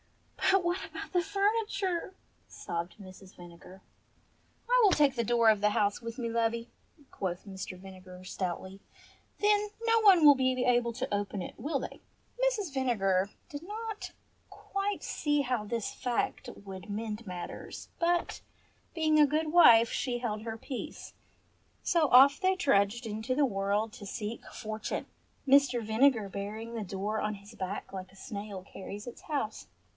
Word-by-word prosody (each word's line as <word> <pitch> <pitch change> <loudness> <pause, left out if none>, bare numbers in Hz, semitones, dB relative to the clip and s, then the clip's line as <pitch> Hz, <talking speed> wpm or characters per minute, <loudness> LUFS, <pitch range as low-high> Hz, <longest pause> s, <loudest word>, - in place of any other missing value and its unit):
"But 385 -1 +4
what 350 +2 -1
about - - -8
the 355 - +3
furniture," 395 -2 0 0.3
sobbed 170 +1 -5
Mrs. 190 -1 -13
Vinegar. 175 +2 -13 0.9
"I - - +5
will 405 - +6
take 290 -5 +4
the 235 - 0
door 235 0 +4
of 215 -2 +3
the 210 - +4
house 205 0 +1
with 230 +1 -6
me, 240 -3 -2
lovey," 230 0 -1 0.4
quoth 180 -1 -4
Mr. 190 -2 -7
Vinegar 185 -1 -12
stoutly. 190 +1 -4 0.6
"Then 415 0 +3
no 455 0 +4
one 380 -7 +7
will 290 -1 +10
be 260 -1 +1
able 240 -1 +3
to 260 -1 -4
open 205 -1 -2
it, - - -6
will 290 -1 -2
they?" - - -7 0.4
Mrs. 430 - 0
Vinegar 200 -8 +1 0.2
did 290 +2 -7
not 430 +2 -6 0.4
quite 395 +1 -3
see 295 -1 0
how 250 -5 -1
this 230 0 -3
fact 245 -2 -2
would 195 0 -10
mend 215 +2 -4
matters, 180 -3 -7
but, 345 0 0 0.5
being 310 -2 +3
a 295 - +7
good 305 +1 0
wife, 235 -10 +8
she 250 -3 -1
held 220 -3 -3
her 225 0 -5
peace. 260 +3 -7 0.7
So 320 -4 +2
off 275 +3 +7
they 375 0 +3
trudged 235 - +2
into 220 +4 -2
the 290 +1 +4
world 205 0 -1
to 210 - -10
seek 210 +3 -5
fortune, 215 0 -4 0.4
Mr. 270 -3 +5
Vinegar 220 0 +3
bearing 210 +4 -6
the 225 -2 -3
door 205 +3 -3
on 210 0 -1
his 200 +2 -14
back 195 0 -5
like 190 -1 -7
a - - -20
snail 200 -4 -7
carries 200 +3 -9
its 240 - -9
house. 275 -8 -3
230 Hz, 160 wpm, -30 LUFS, 200-295 Hz, 0.9 s, will